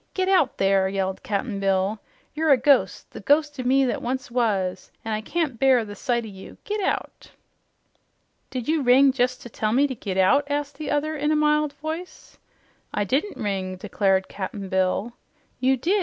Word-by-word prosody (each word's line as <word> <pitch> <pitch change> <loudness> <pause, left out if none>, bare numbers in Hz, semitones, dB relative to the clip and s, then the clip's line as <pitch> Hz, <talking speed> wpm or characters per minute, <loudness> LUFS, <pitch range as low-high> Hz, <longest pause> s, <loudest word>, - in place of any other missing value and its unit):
Get 375 -1 0
out, 365 -9 +3
there!" 195 -1 +2
yelled 190 -1 -2
Cap'n 205 0 -3
Bill. 195 +2 0 0.3
"You're 315 +1 0
a 275 - +7
ghost, 270 +2 +2
the - - -9
ghost 295 -1 +1
o' - - -2
me 265 +2 +3
that 250 - -2
once 255 +1 -3
was, 200 -7 -1
an' 225 - -2
I 215 - -2
can't 290 -1 -2
bear 260 -4 +4
the 205 - -8
sight 235 +2 -1
o' - - -7
you. 195 -2 -11
Git 420 -1 -3
out!" - - -3 1.2
"Did 250 -3 -5
you 315 0 +1
ring 265 +1 +5
jes' 250 0 +1
to - - -11
tell 215 -1 -2
me 275 +4 +4
to 275 - -2
git 195 -5 -5
out?" 280 +10 +3
asked 290 0 -3
the 305 - -4
other 310 +2 0
in 295 0 -1
a 310 - +3
mild 300 -1 +2
voice. 315 +4 -7 0.5
"I - - -2
I - - +3
didn't 275 - -1
ring," 190 -3 -3
declared 190 0 0
Cap'n 195 0 -6
Bill. 190 +5 0 0.5
"You 260 +1 +2
did. 365 +11 +1
250 Hz, 195 wpm, -24 LUFS, 200-290 Hz, 1.2 s, a